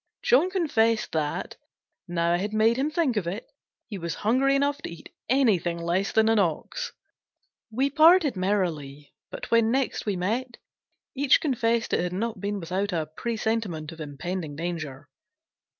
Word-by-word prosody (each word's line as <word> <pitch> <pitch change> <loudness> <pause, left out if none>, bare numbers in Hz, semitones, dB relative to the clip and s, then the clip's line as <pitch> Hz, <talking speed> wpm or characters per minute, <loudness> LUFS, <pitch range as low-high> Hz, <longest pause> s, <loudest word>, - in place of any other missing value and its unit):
John 295 +9 +4
confessed 235 - +1
that, 155 -2 -2 0.5
now 170 0 +1
I - - +3
had 205 +4 -3
made 220 +2 +4
him 275 +3 +1
think 310 -7 0
of 185 -5 -1
it, 195 +6 -4 0.4
he 205 -4 -7
was 170 -1 -3
hungry 265 +5 +3
enough 285 +1 +1
to - - -5
eat 170 -1 -12 0.2
anything 210 - +2
less 175 +4 -1
than 220 0 +3
an 225 -1 +4
ox. 200 - -1 0.8
We 265 +5 0
parted 315 -2 +6
merrily, 165 -8 -2 0.2
but - - -8
when 230 -1 +4
next 265 -2 -1
we 205 - +1
met, 235 +7 -2 0.6
each 275 0 +4
confessed 235 -5 0
it - - +3
had 180 0 -2
not 225 +4 -3
been 205 0 -2
without 190 +4 -2
a 160 -3 -2
presentiment 220 -9 -2
of 165 -1 -10
impending 155 +2 -5
danger. 155 -4 -5
210 Hz, 160 wpm, -26 LUFS, 170-250 Hz, 0.8 s, parted